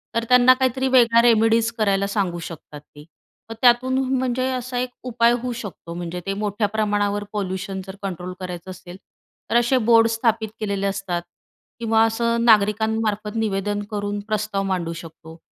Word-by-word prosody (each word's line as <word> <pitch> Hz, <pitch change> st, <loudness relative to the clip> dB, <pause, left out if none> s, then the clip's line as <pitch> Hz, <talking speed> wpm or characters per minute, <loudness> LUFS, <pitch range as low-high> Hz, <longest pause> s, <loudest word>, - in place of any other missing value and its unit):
तर 230 Hz, -, +1 dB
त्यांना 250 Hz, 0 st, +7 dB
काहीतरी 260 Hz, 0 st, 0 dB
वेगळा 235 Hz, -2 st, +5 dB
रेमेडीज 225 Hz, 0 st, +3 dB
करायला 200 Hz, -2 st, +1 dB
सांगू 195 Hz, -4 st, -2 dB
शकतात 150 Hz, -2 st, -10 dB
ते. 145 Hz, 0 st, -16 dB, 0.5 s
मग 225 Hz, -, -6 dB
त्यातून 255 Hz, +1 st, +4 dB, 0.2 s
म्हणजे 255 Hz, 0 st, -1 dB
असा 255 Hz, 0 st, -4 dB
एक 250 Hz, 0 st, -2 dB
उपाय 235 Hz, -1 st, +2 dB
होऊ 250 Hz, 0 st, -3 dB
शकतो. 200 Hz, -6 st, -8 dB
म्हणजे 175 Hz, 0 st, -5 dB
ते 195 Hz, -, -1 dB
मोठ्या 205 Hz, +1 st, -1 dB
प्रमाणावर 205 Hz, -1 st, 0 dB
पॉल्यूशन 190 Hz, -1 st, -3 dB
जर 190 Hz, -, -8 dB
कंट्रोल 180 Hz, -1 st, -5 dB
करायचं 180 Hz, 0 st, -7 dB
असेल, 180 Hz, 0 st, -11 dB, 0.5 s
तर -, -, -1 dB
असे 240 Hz, +2 st, +3 dB
बोर्ड 230 Hz, -1 st, +6 dB
स्थापित 225 Hz, -1 st, 0 dB
केलेले 200 Hz, -2 st, -1 dB
असतात 195 Hz, -3 st, -3 dB, 0.6 s
किंवा 225 Hz, -1 st, +3 dB
असं 230 Hz, +1 st, 0 dB
नागरिकांमार्फत 215 Hz, 0 st, +2 dB
निवेदन 205 Hz, -2 st, -1 dB
करून 205 Hz, 0 st, -3 dB
प्रस्ताव 215 Hz, -2 st, -1 dB
मांडू 180 Hz, -4 st, -2 dB
शकतो. 165 Hz, 0 st, -11 dB
210 Hz, 155 wpm, -22 LUFS, 195-230 Hz, 0.6 s, त्यांना